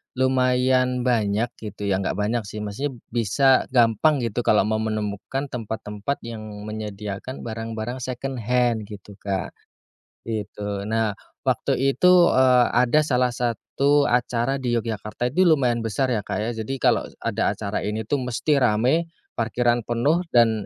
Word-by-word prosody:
lumayan 130 -1 +2
banyak 115 -1 +1
gitu 105 -2 -7
ya 95 - +2
nggak 95 - -2
banyak 105 +2 -1
sih 105 +1 -6
masih 105 +8 -3 0.2
bisa 125 +4 +3
gampang 125 +3 +3
gitu 115 0 -2
kalau 105 - +5
mau 110 +1 0
menemukan 110 +4 -3
tempat-tempat 110 +2 -4
yang 115 -1 -6 0.2
menyediakan 105 +2 -6
barang-barang 115 +2 -5
secondhand 125 -3 -1
gitu, 100 -1 -11
Kak, 100 -1 -3 0.7
itu. 105 -2 -4 0.2
Nah 110 -1 +1 0.3
waktu - - +1 0.2
itu, 180 - +4 0.2
eee, 130 -1 +5 0.2
ada 125 +4 +3
salah 125 -3 +2
satu 130 +4 +1
acara 125 +2 +1
di 125 -2 -1
Yogyakarta, 110 +1 -2
ini 185 - +3
lumayan 130 -7 +3
besar 130 +4 0
ya, 115 - +1
Kak, - - -3
ya. 110 - -1
Jadi 110 +2 -4
kalo - - +3 0.2
ada - - 0
acara - - -3
ini 105 +1 -2
tuh 145 +7 -1
mesti 125 +4 0
rame, 125 +7 +2 0.3
parkiran 120 +1 +1
penuh, 130 +8 +2
dan 115 -4 +4
120 Hz, 140 wpm, -23 LUFS, 110-130 Hz, 0.7 s, kalau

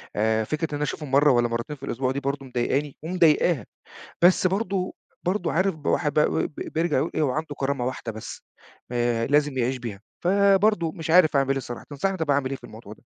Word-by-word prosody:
آآ 110 +1 +2
فكرة 155 +7 -2
إن - - -2
أنا 145 - -2
أشوفهم 150 -1 -4
مرّة 145 +1 +5
والّا 120 -1 +3
مرتين 115 +5 -4
في 135 - -19
الأسبوع 130 0 -1
دي 140 - -2
برضه 140 0 -3
مضايقاني 130 +3 -1
ومضايقاها. 165 - +2 0.6
بس 180 +1 +5
برضه 190 -1 -1 0.3
برضه 180 -1 0
عارف 185 +1 +1
ب 150 -2 -9
الواحد 150 -4 +1
بقى 150 0 +4 0.2
ب - - -21
بيرجع 160 -3 -1
يقول 150 +6 0
إيه - - +1
هو 140 -4 +2
عنده 150 0 -4
كرامة 135 -2 -1
واحدة 125 -2 -4
بس 110 0 -8 0.5
آآ 120 -1 0
لازم 145 -1 +2
يعيش 130 +1 0
بيها. 115 -5 -7 0.2
فبرضه 195 -2 +3
مش 165 -3 -7
عارف 165 -4 +6
أعمل 135 0 +3
إيه 135 - -2
صراحة 120 -2 -8
تنصحني 190 +7 -2
طيب 160 - -2
أنا - - +4
أعمل 130 -2 -4
إيه 135 - -3
في - - -30
الموضوع 110 -1 -11
ده؟ - - -22
145 Hz, 220 wpm, -25 LUFS, 125-165 Hz, 0.6 s, عارف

